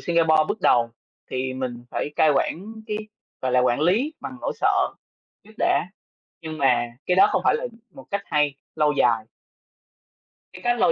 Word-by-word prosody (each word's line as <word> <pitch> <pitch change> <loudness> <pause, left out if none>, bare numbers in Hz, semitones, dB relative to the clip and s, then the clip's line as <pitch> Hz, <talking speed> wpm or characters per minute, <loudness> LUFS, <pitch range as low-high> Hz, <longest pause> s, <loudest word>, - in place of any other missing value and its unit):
Singapore 160 -2 +3
bước 220 - -2
đầu 115 -1 +3 0.4
thì 130 0 -2
mình 125 -2 -5
phải - - -2
cai 155 - +5
quản 165 +6 0 0.2
cái, 210 - -2 0.5
gọi 130 -1 0
là, 125 - +5
quản 125 +1 +2
lý 215 - +2
bằng 265 -1 -7
nỗi - - -2
sợ - - +2 0.5
trước 215 - -17
đã, 165 - +2 0.5
nhưng 160 -1 -6
mà 125 -4 +3 0.2
cái 180 - +2
đó 190 - +7
không - - +1
phải - - +4
là - - -1 0.2
một 135 - -13
cách 200 0 -1
hay, 150 -2 +1 0.2
lâu 150 -1 +2
dài. 115 -6 +2 1.3
Cái - - -11
cách 240 0 +1
lâu 245 - +5
155 Hz, 180 wpm, -24 LUFS, 130-195 Hz, 1.3 s, đó